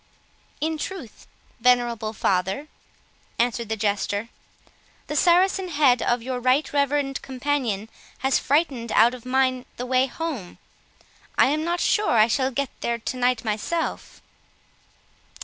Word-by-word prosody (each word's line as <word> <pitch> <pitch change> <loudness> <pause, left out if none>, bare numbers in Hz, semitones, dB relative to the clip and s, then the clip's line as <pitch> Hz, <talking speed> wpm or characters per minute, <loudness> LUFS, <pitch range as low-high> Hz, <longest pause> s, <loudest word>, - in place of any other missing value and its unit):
"In 315 0 -1
truth, 340 - -7 0.3
venerable 240 -2 +2
father," 195 +5 -1 0.7
answered 235 -1 0
the 220 - -1
Jester, 205 +1 -1 0.8
"the - - -5
Saracen 370 +2 +3
head 285 -7 +3
of 240 -1 0
your 255 0 -3
right 255 +5 +1
reverend 280 -1 0
companion 255 -6 -2 0.4
has 265 - +3
frightened 275 -6 0
out 235 +3 +5
of 250 -1 -10
mine 255 -1 +1
the 250 - -4
way 255 +1 +2
home—I 270 - -4
am 300 +3 0
not 345 +1 -1
sure 425 0 +2
I 215 -2 +6
shall 260 +3 +1
get 275 0 -2
there 235 0 -1
to 235 +2 -5
night 250 -2 +1
myself." 220 +11 -3
255 Hz, 130 wpm, -24 LUFS, 230-290 Hz, 0.8 s, I